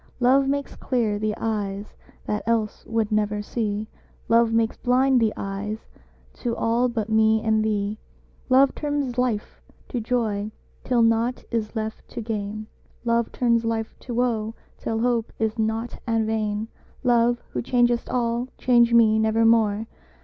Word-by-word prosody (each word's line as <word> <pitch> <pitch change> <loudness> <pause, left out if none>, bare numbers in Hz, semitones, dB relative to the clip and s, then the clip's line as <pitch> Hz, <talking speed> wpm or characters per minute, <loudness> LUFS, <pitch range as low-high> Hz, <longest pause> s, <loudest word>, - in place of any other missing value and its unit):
Love 265 +2 +4
makes 280 0 -2
clear 225 -5 0
the 215 0 -1
eyes 205 -2 -3 0.3
that 210 0 -1
else 225 -2 0
would 225 -1 0
never 210 0 +1
see: 215 -1 -2 0.4
"Love 230 0 +4
makes 225 0 +1
blind 255 +1 +3
the 220 -1 +3
eyes 200 +2 -4 0.5
to 235 -2 -3
all 235 +2 +1
but 225 -3 -2
me 220 0 +4
and 220 -1 +2
thee." 210 0 -1 0.5
Love 265 +1 +5
turns 290 -4 -2
life 235 -4 -1 0.3
to 245 - -3
joy 215 -3 -1 0.3
till 245 -2 +2
nought 230 +2 +1
is 225 -1 -2
left 220 0 -4
to - - -7
gain: 215 -1 -4 0.4
"Love 235 -1 +1
turns 235 -2 +2
life 225 -1 -2
to 250 - -9
woe 230 -2 0 0.2
till 225 0 -2
hope 235 -2 0
is 220 0 -1
nought 220 +2 -2
and 225 -1 +1
vain." 215 -1 -1 0.4
Love, 240 -1 +3
who - - -2
changest 240 -1 +1
all, 240 0 0
change 235 -1 +4
me 220 -2 +5
nevermore! 220 -1 +3
225 Hz, 150 wpm, -24 LUFS, 215-240 Hz, 0.5 s, Love